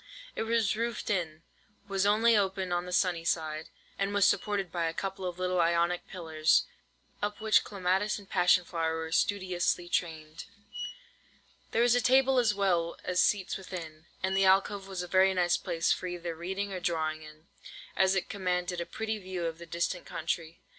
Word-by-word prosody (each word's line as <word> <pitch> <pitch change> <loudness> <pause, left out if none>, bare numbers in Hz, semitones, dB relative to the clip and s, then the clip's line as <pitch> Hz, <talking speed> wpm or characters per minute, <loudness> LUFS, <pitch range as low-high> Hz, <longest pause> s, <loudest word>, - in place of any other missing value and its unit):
It - - -2
was 225 -3 +2
roofed 230 0 -2
in, 165 -5 -2 0.4
was 195 0 +1
open - - +6
only 225 +2 +4 0.4
on 175 0 -1
the - - -6
sunny 180 -2 +1
side, 160 -2 -2 0.3
and 200 +1 -1
was 205 - +5
supported 200 -4 +1
by 170 -2 -1
a 165 0 -2
couple 195 -1 -4
of 175 -1 -5
little 180 -1 +1
Ionic 170 +1 +1
pillars, 160 -3 +1 0.6
up 205 0 -2
which 220 -1 +4
clematis 195 +1 0
and 200 -2 -12
passion 180 -1 +3
flower 165 -2 -1
were 160 0 -5
studiously 180 -2 0
trained. 160 -2 -3 1.2
There 230 - +2
was 240 -1 +5
a 245 - +3
table 260 +1 +4
as 220 -4 +2
well 175 -4 +1
as 180 0 +1
seats 195 -3 +1
within; 165 -5 -8 0.2
and 190 0 +1
the 195 - +3
alcove 195 +1 +3
was 190 -2 -4
a - - -6
very 190 +1 +4
nice 175 -1 +3
place 170 -2 -1
for 185 - 0
either 175 -1 -4
reading 190 +4 -4
or 185 - -3
drawing 160 -3 -1
in, 155 +1 -14 0.5
as 190 0 +3
it 190 - -1
commanded 180 -3 -2
a 170 - -5
pretty 220 -1 -3
view 185 -3 -4
of 165 0 -4
the 170 - -10
distant 170 +1 -2
country. 165 0 -4
180 Hz, 180 wpm, -30 LUFS, 170-200 Hz, 1.2 s, open